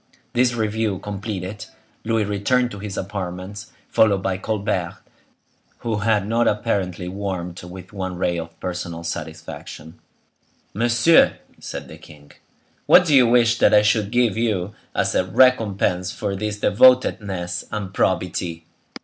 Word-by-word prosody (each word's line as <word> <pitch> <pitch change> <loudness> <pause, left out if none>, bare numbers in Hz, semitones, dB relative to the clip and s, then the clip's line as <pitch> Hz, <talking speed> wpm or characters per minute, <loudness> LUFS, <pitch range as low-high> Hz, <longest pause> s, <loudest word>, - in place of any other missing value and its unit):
This 120 0 +2
review 110 -2 -1
completed, 100 0 -6 0.4
Louis 110 -1 0
returned 120 +5 +1
to 100 - -8
his 105 0 -6
apartments, 95 +1 -6 0.2
followed 100 -3 +3
by 95 -1 -1
Colbert, 100 -5 -2 0.8
who 115 -2 -1
had 105 -1 +1
not 115 +2 +2
apparently 100 -4 -1
warmed 90 -2 -5
with 90 +1 -11
one 95 -2 -4
ray 85 -1 0
of 85 0 -9
personal 85 -2 -5
satisfaction. 80 -1 -7 0.7
"Monsieur," 120 +8 +4 0.2
said - - -7
the - - -12
king, 75 -1 -16 0.6
"what 180 - +7
do 155 - +1
you 130 -3 +6
wish 115 -1 +3
that - - +5
I 105 - +6
should 105 -1 +2
give 120 -3 +2
you, 105 -4 -1 0.2
as - - +1
a - - +2
recompense 100 -4 +2
for 100 -1 -3
this 105 +1 -3
devotedness 100 -7 +3
and 100 -3 -4
probity?" 90 -3 -1
100 Hz, 135 wpm, -22 LUFS, 90-110 Hz, 0.8 s, what